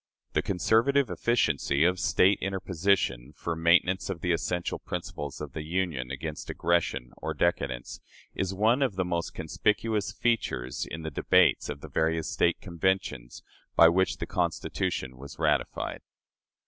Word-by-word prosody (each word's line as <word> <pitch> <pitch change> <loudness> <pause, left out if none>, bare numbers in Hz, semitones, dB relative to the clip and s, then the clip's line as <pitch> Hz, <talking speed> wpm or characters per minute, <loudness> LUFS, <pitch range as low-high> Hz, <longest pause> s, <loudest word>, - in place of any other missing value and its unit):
The - - +2
conservative 115 - +2
efficiency 80 - +1
of 90 +2 +2
"State 95 +3 +3
interposition," 95 -8 0
for 85 - -3
maintenance 85 +4 +3
of 90 -4 -4
the 90 - 0
essential 85 +1 -1
principles 75 -2 -5
of - - -7
the 80 - -4
Union 80 -6 -2
against 75 +3 -5
aggression 85 -7 0
or - - -4
decadence, 65 -8 -1 0.3
is 95 0 -2
one 110 +7 +2
of 130 -8 +1
the 95 -1 0
most 85 -1 -2
conspicuous 105 +5 0
features 65 - -1
in 80 - -6
the 80 - -4
debates - - +3
of 70 -1 -5
the - - -8
various 80 0 0
State 85 - +2
Conventions 90 -9 -2 0.3
by 85 - +8
which 95 +2 +1
the - - -4
Constitution 65 -1 -2
was 70 +2 -10
ratified. - - -1
85 Hz, 145 wpm, -28 LUFS, 75-95 Hz, 0.3 s, by